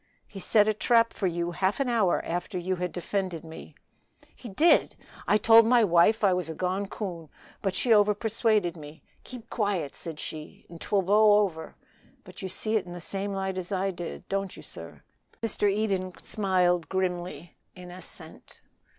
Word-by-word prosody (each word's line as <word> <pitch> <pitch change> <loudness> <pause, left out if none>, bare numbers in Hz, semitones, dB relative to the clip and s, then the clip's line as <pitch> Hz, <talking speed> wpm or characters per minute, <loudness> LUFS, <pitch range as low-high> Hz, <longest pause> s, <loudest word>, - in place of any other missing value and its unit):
"He 195 - -10
set 210 +2 +3
a 215 - +3
trap 230 +2 +3
for 195 - -1
you 170 0 -2
half 190 +6 -1
an 275 - 0
hour 225 -7 +1
after 175 +3 -3
you 185 +1 -2
had 180 0 -3
defended 185 -2 -3
me." 160 0 -11 0.6
"He 240 - -10
did! 315 - +3 0.3
I 210 - +4
told 225 +1 +6
my 240 -1 +5
wife 200 +4 +4
I 195 -2 +5
was 180 -3 -2
a 160 - -5
gone 185 +3 -2
coon, 175 -7 -6 0.3
but 195 -2 -1
she 240 - +1
overpersuaded 210 -3 +2
me; 150 0 -12 0.2
'Keep 245 -2 -11
quiet,' 200 - -1
said 160 -3 -8
she, 155 -1 -8
'and 170 -1 -12
'twill 200 -2 +1
blow 210 +2 +5
over.' 160 -6 -4 0.5
But - - -12
you 190 - -4
see 215 +4 0
it 190 -4 -4
in 175 - -8
the 175 - -7
same 195 +3 -4
light 190 -1 -3
as 180 +2 -7
I 195 0 0
did, 175 -2 -8
don't 195 -1 -3
you, - - -11
sir?" - - -11 0.4
Mr. 210 -2 +1
Eden 195 -3 -1
smiled 180 -5 0
grimly 180 -3 -3 0.2
in 180 -1 -11
assent. 180 +1 -11
190 Hz, 180 wpm, -27 LUFS, 175-210 Hz, 0.6 s, told